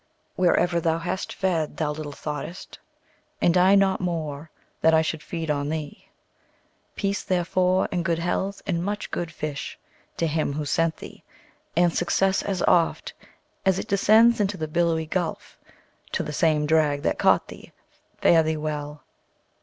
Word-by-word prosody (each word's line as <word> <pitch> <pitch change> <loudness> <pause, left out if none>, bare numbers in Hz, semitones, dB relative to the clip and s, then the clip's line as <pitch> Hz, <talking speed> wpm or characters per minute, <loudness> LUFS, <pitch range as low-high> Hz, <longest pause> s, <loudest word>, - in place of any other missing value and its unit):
Wherever 175 -1 +2
thou 165 -1 +1
hast 175 +3 -4
fed, 170 -5 -1
thou 155 -2 0
little 150 -1 -6
thought'st, 150 +4 -7 0.6
And 170 - +3
I 185 +2 +5
not 195 -1 +3
more, 160 -4 -3 0.3
that 160 0 +5
I 160 - +4
should 160 -1 -3
feed 165 -2 -4
on 145 0 -1
thee. 155 -2 -5 0.9
Peace, 200 0 -1
therefore, 185 +1 +1
and 175 -2 -1
good 170 -1 0
health, 190 +3 -2
and 170 -1 -1
much 205 +2 -4
good 170 -1 -3
fish, 150 -3 -5 0.4
To 170 - +1
him 155 -2 -1
who 150 +1 -3
sent 165 +2 0
thee! - - -12 0.5
and 175 -1 +3
success, 190 +2 +1
as 195 -3 -2
oft 170 -2 +2 0.5
As 190 -1 +2
it - - -4
descends 220 +4 +5
into 200 -1 0
the 155 -2 -3
billowy 165 0 +1
gulf, 170 +1 -3 0.6
To - - 0
the 150 - -5
same 155 -1 +2
drag 150 -2 +2
that - - 0
caught - - +3
thee! - - -12 0.5
Fare 165 -1 +6
thee 160 0 -1
well! 150 -1 -5
165 Hz, 160 wpm, -25 LUFS, 155-185 Hz, 0.9 s, Fare